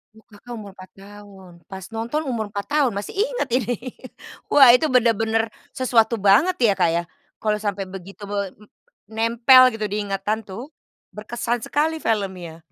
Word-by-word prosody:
Oh 220 - -20
Kakak 220 +3 -15
umur 200 -2 -10
4 185 -1 -14
tahun, 195 -2 -14 0.2
pas 190 -1 -8
nonton 235 +8 -2
umur 230 -4 -2
4 200 -1 -5
tahun. 290 -4 +1
Masih 200 - -6
inget - - -1
ini, 245 -1 0 0.8
wah 275 -3 +8
itu 300 +2 0
benar-benar 225 -2 +2 0.2
sesuatu 230 -3 +1
banget 215 - +4
ya 200 - +3
Kak 180 -3 +2
ya, 170 +1 -1 0.4
kalau 215 -1 0
sampai 200 -2 -4
begitu 195 +2 -10
be 200 -2 -3 0.6
nempel 235 +3 +5
gitu 215 -1 -4
di 205 +1 -3
ingatan 205 +2 -3
tuh, 210 +8 -9 0.5
berkesan 235 +2 -3
sekali 315 +2 0
filmnya. 185 -6 -3
220 Hz, 155 wpm, -22 LUFS, 200-245 Hz, 0.8 s, wah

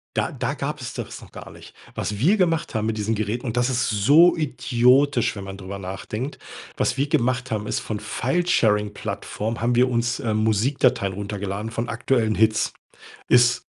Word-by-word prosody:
Da - - 0
da - - -2
gab's - - -5
das - - -6
noch - - -15
gar - - -10
nicht. - - -14 0.2
Was 105 - -3
wir 175 - +4
gemacht 165 - 0
haben 110 0 0
mit 110 -1 -1
diesen 105 +2 0
Geräten, 110 +4 -3
und 115 +1 -3
das 125 +2 +2
ist 125 0 0
so 145 - +5
idiotisch, 130 -3 +2
wenn 100 - -6
man 95 0 -7
drüber 100 +1 -7
nachdenkt... 105 +8 -5 0.4
Was - - 0
wir 140 +2 0
gemacht 130 -4 0
haben 105 -1 -2
ist, - - -1
von 105 -2 -4
Filesharing-Plattformen 110 - -1
haben 120 +1 +1
wir 125 +2 +4
uns, 120 0 -1
ähm, 110 -2 -1
Musikdateien 110 -1 +1
runtergeladen 100 +2 -4
von 115 +1 -3
aktuellen 115 -2 0
Hits. 110 0 +2 0.6
Ist 120 0 +4
115 Hz, 175 wpm, -23 LUFS, 105-130 Hz, 0.6 s, so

